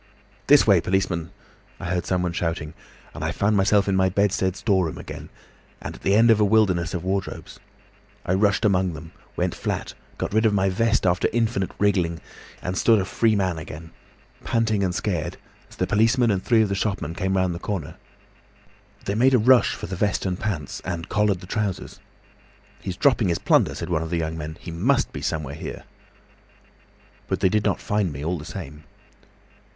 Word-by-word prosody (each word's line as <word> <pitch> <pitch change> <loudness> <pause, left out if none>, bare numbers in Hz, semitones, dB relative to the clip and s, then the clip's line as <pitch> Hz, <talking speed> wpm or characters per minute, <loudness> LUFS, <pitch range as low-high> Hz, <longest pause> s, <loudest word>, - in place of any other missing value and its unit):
"'This - - +7
way, - - +5
policeman!' 90 -3 -1 0.5
I 95 - -7
heard 90 0 -2
someone 90 -2 0
shouting. 80 -3 -3 0.4
I - - -3
found 105 +1 +1
myself 100 0 +3
in 95 - +1
my 95 0 +3
bedstead 95 -1 +1
storeroom 95 -7 0
again, - - -8 0.5
and - - -6
at - - -13
the 100 - +2
end 115 +2 +6
of 110 - +4
a - - +4
wilderness 100 -4 +2
of 90 - -4
wardrobes. 95 +1 -4 0.7
I 90 - +1
rushed 100 +2 +2
among 95 -3 +2
them, 80 +1 -10 0.2
went - - -1
flat, - - -4 0.2
got - - -3
rid 110 +1 +4
of 105 - +1
my 95 0 +2
vest 115 +2 +1
after 90 -1 +2
infinite 110 -5 0
wriggling, 90 -5 +1 0.4
and 90 - -2
stood 110 +2 +4
a 95 - -1
free 110 +3 +2
man 95 -5 0
again, 80 0 -9 0.5
panting 110 -3 +1
and 90 -2 -1
scared, 90 -4 -2 0.3
as - - -15
the - - 0
policeman 115 +2 +3
and 95 -2 -1
three 115 -2 +4
of 105 - -1
the - - -1
shopmen 100 -5 -2
came 95 +2 -1
round 95 -1 +1
the 85 - -6
corner. 85 -6 -4 1.1
They 100 - -1
made 130 +5 +4
a - - +6
rush 125 +2 +4
for - - -7
the 95 - -5
vest 100 +1 0
and 90 -1 -2
pants, 90 -10 -4
and 85 -2 -4
collared 105 -3 +1
the - - -9
trousers. 100 0 -3 0.8
'He's 95 -1 -5
dropping 125 -7 +3
his 85 -2 +1
plunder,' - - +2
said 85 +1 -5
one 80 -2 +1
of 80 - -4
the 85 - -1
young 80 -1 -2
men. 80 0 -6
'He 85 - -8
must 110 +13 +1
be - - -6
somewhere 75 -3 -3
here.' 75 - -7 1.4
"But - - -1
they 95 - +4
did 105 +1 0
not - - +1
find 105 -4 -1
me 70 +1 -6
all 85 +1 -1
the 75 - -9
same. 80 -3 -8
95 Hz, 195 wpm, -24 LUFS, 85-105 Hz, 1.4 s, This